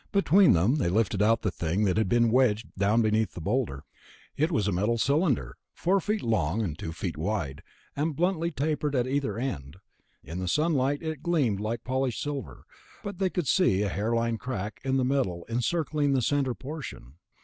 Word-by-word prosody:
Between 195 -2 +5
them 95 - +3
they 130 - +1
lifted 105 0 +1
out 115 +2 +3
the 105 - 0
thing 85 +4 -1
that 95 -3 +2
had 110 -2 +1
been 120 0 +3
wedged 115 -3 +2
down 105 +4 +2
beneath 110 0 +1
the - - -5
boulder. 80 - -1 0.5
It 155 +4 +1
was 105 - +1
a - - +1
metal 105 +6 +1
cylinder, 135 - +1 0.2
four 190 +3 +2
feet 210 +3 -2
long, 105 -3 0
two 80 -1 -6
feet 85 -1 -4
wide, 80 -5 -2 0.3
and 150 +1 -1
bluntly 170 0 +1
tapered 150 -1 -1
at 125 -2 +2
either 130 -5 -1
end. 80 - -4 0.5
In 80 +6 -6
the 90 - -3
sunlight 145 - +1
it 160 -3 -4
gleamed 140 - +1
like 110 +2 -3
polished 130 -1 -1
silver, 145 -2 -5 0.4
but 200 -3 -6
they 190 -1 +2
could 175 -5 -2
see 110 - +3
a 100 - 0
hairline 115 +4 0
break 105 -3 -5
in 135 0 +1
the 130 - +2
metal 125 -11 -1
encircling 145 +4 0
the 130 -2 +1
center 135 -1 +1
portion. 135 - -8
120 Hz, 185 wpm, -27 LUFS, 100-145 Hz, 0.5 s, Between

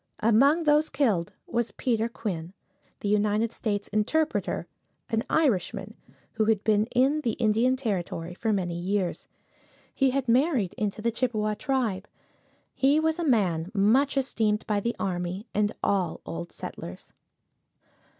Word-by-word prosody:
Among 275 +9 +5
those 300 0 +3
killed 220 - +1
was 235 -1 -1
Peter 230 -2 -1
Quinn, 180 -7 -5 0.5
the - - -2
United 210 +2 +2
States 205 -3 -2
interpreter, 305 +10 0 0.5
an 225 0 +1
Irishman, 215 - +1 0.4
who 220 -1 0
had 215 -2 +2
been 215 0 +2
in 270 +5 +2
the 235 -6 0
Indian 230 +3 +2
territory 180 -8 -3
for 220 +5 -1
many 185 -4 -1
years. 185 0 -2 0.7
He 270 -1 +3
had 265 0 -1
married 245 - +2
into 215 -2 -3
the 235 - +2
Chippewa 220 -3 0
tribe. 220 -6 -1 0.7
He 280 +3 +3
was 320 +1 0
a - - 0
man 190 - +1
much 250 +9 +3
esteemed 220 -5 0
by 210 -2 +1
the 235 +4 -2
army 180 +2 -3
and 210 0 +1
all 185 -5 0
old 170 +1 -6
settlers. 90 +1 -9
220 Hz, 140 wpm, -27 LUFS, 200-255 Hz, 0.7 s, Among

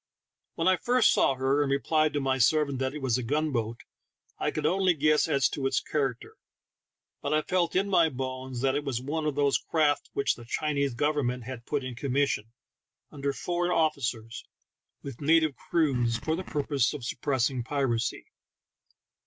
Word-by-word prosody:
When 165 - 0
I 185 -1 +5
first 245 +1 +3
saw 135 - +3
her, 135 +2 +1
and 145 - 0
replied 155 +2 +2
to 145 - 0
my 135 -1 0
servant 140 +1 +2
that 130 +2 -2
it 150 - -6
was 125 -2 +1
a - - -2
gunboat, 120 -4 -1 0.6
I - - 0
could - - -3
only 185 -1 +3
guess 155 0 +3
as 135 -3 +3
to 135 -2 -2
its 135 0 +1
character, 135 -5 -3 0.8
but 145 +2 0
I 155 - +1
felt 175 -2 0
in 195 +2 +2
my 170 -5 +4
bones 130 -2 -5
that 135 0 +2
it 145 +1 -1
was 135 -5 -2
one 155 +4 -3
of 150 - -1
those 140 -1 +2
craft 150 -3 0
which 140 - +1
the 120 - -12
Chinese 140 0 -1
government 130 -3 0
had 120 -1 -8
put 145 -2 -1
in 130 -1 -5
commission, 130 -3 -1 0.6
under 140 -1 -2
foreign 175 +4 -2
officers, 120 -9 -1 0.6
with 135 -2 -8
native 155 -1 +3
crews, 125 -7 0
for 160 +7 -2
the 185 - -4
purpose 140 -6 0
of 135 -5 -7
suppressing 130 -1 -1
piracy. 130 -3 -1
140 Hz, 175 wpm, -28 LUFS, 130-155 Hz, 0.8 s, I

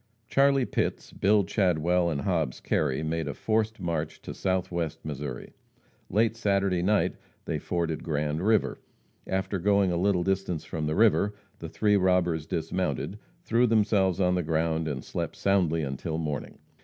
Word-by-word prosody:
Charlie 135 0 +3
Pitts, - - -2
Bill 100 +1 +3
Chadwell 90 -2 +1
and 75 -4 -2
Hobbs 80 -8 -1
Kerry 75 0 0
made 80 -1 -2
a 70 - -4
forced 110 0 0
march 80 -3 -3
to - - -6
Southwest 90 -4 -2
Missouri. 70 -4 -6 0.6
Late 110 +3 +2
Saturday 100 -4 +1
night 105 +4 +1 0.3
they - - -2
forded 85 -2 -2
Grand 75 0 -1
river. 110 +1 +2 0.5
After 95 0 -1
going 100 0 +3
a 85 - 0
little 90 0 +2
distance 95 -3 -1
from 75 -2 -3
the 75 - -1
river, 105 -1 +3 0.2
the 80 - -6
three 105 +4 +2
robbers 90 -4 +2
dismounted, 90 - -2 0.2
threw 120 +2 +3
themselves 105 -5 +2
on 90 -1 +3
the 90 - +1
ground, 80 0 0
and 70 -4 -3
slept - - -4
soundly 90 -5 +1
until 70 +4 -3
morning. 75 -4 -4
90 Hz, 155 wpm, -27 LUFS, 80-100 Hz, 0.6 s, Charlie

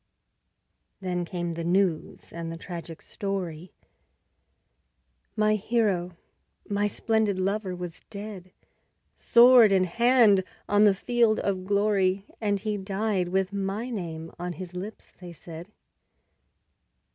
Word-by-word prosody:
Then 180 -2 -2
came 175 -1 -4
the 170 0 -5
news 175 -1 -1
and 170 -1 -5
the 165 - -6
tragic 170 -1 -8
story: 185 -5 -5 1.6
My 215 -1 +3
hero, 200 -5 0 0.5
my 205 0 0
splendid 220 -2 0
lover 195 0 -1
was 175 -2 -6
dead, 200 -3 -8 0.6
Sword 235 -2 +7
in 190 -1 +4
hand 225 0 +4 0.2
on 205 +1 +4
the 200 -2 +5
field 230 +2 +2
of 190 -2 -2
glory, 200 -1 +1 0.2
And 205 -2 0
he 210 -1 -2
died 195 -1 -1
with 190 +1 0
my 200 +5 -3
name 165 -6 -5
on 175 0 -4
his 180 +2 -8
lips, 195 +4 -8
they 175 -2 -9
said. 170 +3 -10
195 Hz, 120 wpm, -26 LUFS, 180-210 Hz, 1.6 s, Sword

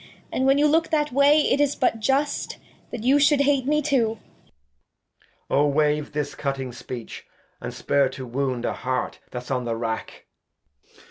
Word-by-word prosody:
And 260 - +1
when 270 +1 +5
you 295 - +4
look 320 +2 +3
that 300 -2 +1
Way, 285 +3 +5
it 285 -1 +2
is 290 -1 +2
but 235 -3 +1
just 275 +6 0 0.3
That 240 -3 -6
you 270 +4 +4
shou'd 290 0 +4
hate 280 -2 +2
me 300 +1 +2
too. 240 -6 +1
Edg. 70 - -35 0.3
O 145 +1 +3
wave 150 +1 +1
this 145 -1 -2
cutting 135 -2 -3
Speech, 120 -1 -8 0.3
and - - -5
spare 140 -2 +1
to 130 0 -8
Wound 125 -1 -2
A - - -1
Heart 130 0 -3
that's 125 +1 -7
on 125 -2 -1
the 115 -1 -1
Rack. 115 -1 -5
155 Hz, 175 wpm, -24 LUFS, -, 0.3 s, when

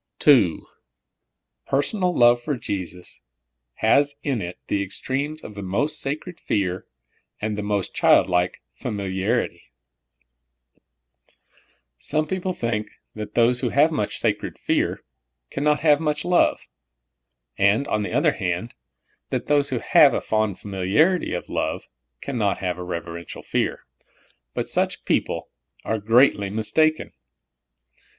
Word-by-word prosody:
II. 125 - +6 1.1
Personal 180 +7 +1
love 120 -5 +5
for 145 +1 -2
Jesus 90 -5 -6 0.5
has 140 +6 +3
in 135 -7 -1
it 90 0 -6
the 100 - 0
extremes 140 +10 -4
of 105 - -8
the 100 - -7
most 105 +11 -1
sacred 155 +5 -5
fear 95 -3 -1 0.5
and 105 0 -2
the 105 - -3
most 105 -2 -2
child - - +5
like 90 0 0
famil 100 - -4
iarit3^ 110 +6 -1 2.4
Some 155 +1 0
people 185 +3 -2
think 115 -9 -2 0.2
that 105 -1 -7
those 120 +1 +4
who 125 - 0
have 145 +6 +4
much 105 -10 -1
sacred - - -1
fear - - -1 0.5
can 140 - -3
not 150 0 +2
have 150 -2 +5
much 150 -2 -1
love; 180 0 +3 1.0
and, 100 +8 +3
on 105 - 0
the 105 - -3
other - - +3
hand, 90 +6 -3 0.6
that - - -2
those 145 -1 +2
who 130 - -1
have - - +5
a - - +1
fond 110 -3 0
familiarity 105 - +1
of 90 - -5
love - - -3 0.3
can 130 -4 -4
not 100 -3 +1
have 90 -2 -3
a - - -4
reverential 85 -1 -6
fear; - - -2 0.7
but - - -2
such - - -1
people - - -1 0.3
are 110 - -1
greatly 115 -1 +4
mistaken. 155 +10 +1
115 Hz, 135 wpm, -23 LUFS, 100-145 Hz, 2.4 s, II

